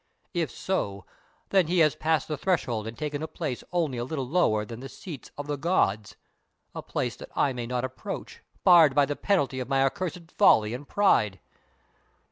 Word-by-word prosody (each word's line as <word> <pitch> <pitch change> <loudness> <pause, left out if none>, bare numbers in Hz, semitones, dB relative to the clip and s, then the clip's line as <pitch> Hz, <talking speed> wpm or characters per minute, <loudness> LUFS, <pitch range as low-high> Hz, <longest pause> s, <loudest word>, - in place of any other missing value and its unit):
If 170 -5 0
so, 100 - -3 0.4
then 190 -4 +3
he 180 +2 0
has 150 - +1
passed 160 0 0
the 155 - -2
threshold 130 - -1
and 115 - -7
taken 150 -1 -3
a 160 - -3
place 150 -7 -4
only 160 -8 0
a - - -1
little 135 0 -3
lower 115 -9 +2
than 115 +2 -8
the 135 +1 -8
seats 155 -4 -9
of 145 - -5
the 145 0 -3
gods, 110 - 0 0.6
a - - -5
place - - -3
that - - -10
I 140 - +2
may 120 -2 -4
not 125 +1 -1
approach, 130 0 -7 0.2
barred 165 -6 +7
by 145 -1 +5
the 145 +1 -3
penalty 145 -10 0
of 125 0 -5
my 135 -1 +3
accursed 175 +2 -3
folly 110 +1 +4
and 135 +4 -7
pride! 105 - +3
145 Hz, 190 wpm, -27 LUFS, 120-165 Hz, 0.6 s, barred